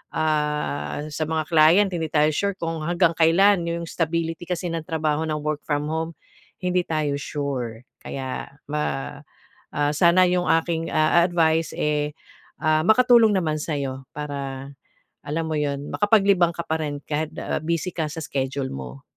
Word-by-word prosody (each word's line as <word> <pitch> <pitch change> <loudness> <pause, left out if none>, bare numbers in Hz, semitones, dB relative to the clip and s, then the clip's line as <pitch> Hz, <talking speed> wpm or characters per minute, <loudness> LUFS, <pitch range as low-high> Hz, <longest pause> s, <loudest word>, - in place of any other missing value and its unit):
ah, 150 -2 -1
sa 155 +2 -2
mga 160 0 0
client 165 +6 +6
hindi 165 -3 -2
tayo 150 0 +4
sure 200 +5 -1
kung 165 -1 -3
hanggang 170 0 +3
kailan 175 +3 +4
'yong 170 0 -2
stability 165 +1 -2
kasi 180 0 -2
ng 165 -1 -4
trabaho 155 -2 0
ng 155 - -1
work 155 -1 -2
from 145 -1 0
home, 160 +1 -2 0.5
hindi 180 0 +2
tayo 155 -3 0
sure. 125 -6 -4 0.2
Kaya 130 -1 -5 0.2
ma 145 -1 -3 0.6
ah, 145 0 +1
sana 175 +3 +5
'yong 180 -2 +1
aking 165 -1 -3
a 155 +2 +4
advice 165 -2 +2
eh, 150 0 0 0.5
ah, 155 0 +3
makatulong 235 0 +6
naman 155 -4 0
sa 155 - -2
iyo. 135 -1 -4
Para 140 -2 -5 0.6
alam 160 +3 -2
mo 155 - 0
'yon, 140 -1 -1
makapaglibang 200 -5 +3
ka 170 - -3
pa 160 - 0
rin 145 -1 -4
kahit 155 +1 -2
na - - -2
busy 170 +2 -1
ka 160 -3 -1
sa 160 +1 -6
schedule 135 -1 -2
mo. 65 0 -8
155 Hz, 160 wpm, -23 LUFS, 145-170 Hz, 0.6 s, client